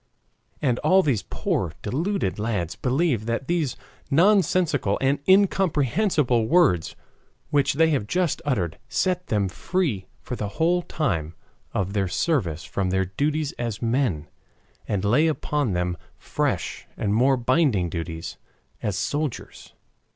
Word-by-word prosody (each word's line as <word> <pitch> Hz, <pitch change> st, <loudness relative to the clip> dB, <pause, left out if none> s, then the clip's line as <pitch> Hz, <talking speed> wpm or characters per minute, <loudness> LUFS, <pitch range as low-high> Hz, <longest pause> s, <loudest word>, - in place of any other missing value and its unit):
And 125 Hz, -4 st, +2 dB
all 185 Hz, +5 st, +4 dB
these 130 Hz, -9 st, +1 dB
poor 90 Hz, -2 st, -2 dB
deluded 155 Hz, -, -1 dB
lads 105 Hz, -7 st, -2 dB
believe 130 Hz, -4 st, 0 dB
that 115 Hz, +3 st, -2 dB
these 165 Hz, -7 st, 0 dB, 0.3 s
nonsensical 170 Hz, -, +3 dB
and 135 Hz, +1 st, +1 dB
incomprehensible 165 Hz, -, +3 dB
words 130 Hz, -, +3 dB, 0.6 s
which 145 Hz, -1 st, +3 dB
they 160 Hz, +3 st, +3 dB
have 130 Hz, -9 st, 0 dB
just 180 Hz, +1 st, 0 dB
uttered 95 Hz, -, -1 dB
set 180 Hz, -1 st, 0 dB
them 105 Hz, -3 st, +1 dB
free 125 Hz, -, -2 dB
for 125 Hz, -, -6 dB
the 105 Hz, -, -3 dB
whole 175 Hz, +2 st, +3 dB
time 85 Hz, -, -2 dB, 0.4 s
of 95 Hz, 0 st, -2 dB
their 100 Hz, -2 st, +1 dB
service 90 Hz, -, 0 dB
from 95 Hz, -2 st, -2 dB
their 95 Hz, +1 st, +1 dB
duties 145 Hz, -, -1 dB
as 115 Hz, -5 st, -3 dB
men, 115 Hz, -, 0 dB, 0.6 s
and 100 Hz, -1 st, -1 dB
lay 125 Hz, +10 st, +4 dB
upon 150 Hz, -6 st, -1 dB
them 90 Hz, 0 st, -1 dB, 0.2 s
fresh -, -, -2 dB
and 105 Hz, -2 st, 0 dB
more 130 Hz, +4 st, +4 dB
binding 125 Hz, -, +2 dB
duties 80 Hz, -1 st, -5 dB, 0.4 s
as 100 Hz, -3 st, -2 dB
soldiers. 145 Hz, +6 st, -4 dB
125 Hz, 130 wpm, -24 LUFS, 100-155 Hz, 0.6 s, all